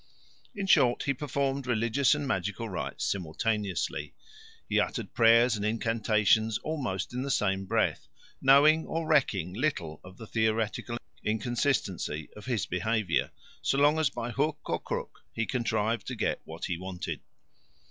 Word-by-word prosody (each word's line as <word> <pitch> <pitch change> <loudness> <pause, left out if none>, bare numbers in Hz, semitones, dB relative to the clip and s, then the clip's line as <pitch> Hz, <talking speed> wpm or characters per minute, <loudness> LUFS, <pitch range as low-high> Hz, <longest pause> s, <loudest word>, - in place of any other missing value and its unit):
In 200 -1 -2
short, 125 -10 +4
he 140 - +1
performed 140 -1 -2
religious 120 +4 +2
and 145 -1 -3
magical 105 +1 -2
rites 95 - -4
simultaneously; 100 +3 -2 0.5
he - - +2
uttered - - -2
prayers 115 +1 +5
and 105 - -4
incantations 110 0 +2
almost 125 -11 -3
in 125 - -2
the 140 - -3
same 95 -6 +1
breath, - - 0 0.3
knowing 145 +4 +6
or 165 0 -2
recking 105 - +2
little 95 - -2
of 95 +1 -13
the 115 - -9
theoretical 110 +1 -1 0.3
inconsistency 110 - -1
of 105 +2 -11
his 120 -5 0
behaviour, 100 0 0 0.3
so 135 - +1
long 145 +2 +4
as 155 -4 +3
by 120 -2 -4
hook 150 +4 0
or - - 0
crook - - -5
he 115 - -1
contrived 115 -2 -1
to 130 - -3
get 110 - -1
what 80 +1 -6
he 85 - -2
wanted. 95 -1 -5
115 Hz, 145 wpm, -29 LUFS, 100-135 Hz, 0.5 s, knowing